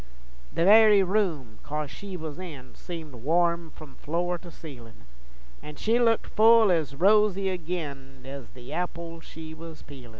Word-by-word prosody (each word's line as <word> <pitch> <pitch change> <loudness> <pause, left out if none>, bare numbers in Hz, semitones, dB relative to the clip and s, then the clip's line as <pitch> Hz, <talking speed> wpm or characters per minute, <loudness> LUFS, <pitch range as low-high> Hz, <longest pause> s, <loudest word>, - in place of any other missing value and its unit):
The 170 - 0
very 210 0 +7
room, 170 - -1
coz 150 -1 -4
she 195 -2 -7
was 160 0 -7
in, 145 -8 -9
Seemed 165 -5 -8
warm 170 +6 0
f'om 150 -4 -12
floor 175 +3 -2
to 175 - -12
ceilin', 120 - -12 0.6
An' 150 0 -10
she 225 +9 +1
looked 230 -2 +2
full 225 -1 +5
ez 155 -5 0
rosy 195 +2 +3
agin 145 -7 -6
Ez 135 -4 -8
the 125 +3 -10
apples 170 -1 -5
she 160 0 -10
was 160 0 -11
peelin'. 130 -4 -12
165 Hz, 155 wpm, -27 LUFS, 140-185 Hz, 0.6 s, very